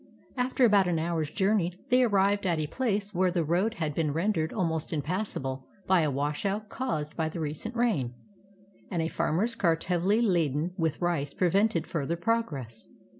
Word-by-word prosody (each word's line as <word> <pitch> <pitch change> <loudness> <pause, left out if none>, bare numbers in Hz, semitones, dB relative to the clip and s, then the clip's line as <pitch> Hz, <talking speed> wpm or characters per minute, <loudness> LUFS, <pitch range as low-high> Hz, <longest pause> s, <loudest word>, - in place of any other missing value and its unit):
After 255 0 +2
about 200 -4 +5
an 175 -2 +1
hour's 160 -2 -1
journey, 190 0 +1 0.2
they 250 +1 +5
arrived 200 -3 +2
at 170 -2 +1
a 155 - -1
place 205 - -1
where 185 0 +2
the 175 -1 0
road 185 +8 +1
had 155 -6 -2
been 150 -2 0
rendered 165 -1 0
almost 165 -5 -1
impassable 145 -5 -3 0.2
by 185 -2 +4
a 155 - +1
washout 150 +10 -2
caused 155 - -3
by 160 -1 -1
the 165 - -6
recent 160 +10 -4
rain, 180 - 0 0.7
and 170 -3 -1
a - - 0
farmer's 190 +8 0
cart 165 -7 +1
hea\ily 185 +4 +2
laden 170 - +1
with 165 -4 -1
rice 155 -5 -1
prevented 190 0 +2
further 165 0 -2
progress. 150 - -2
175 Hz, 170 wpm, -28 LUFS, 155-205 Hz, 0.7 s, about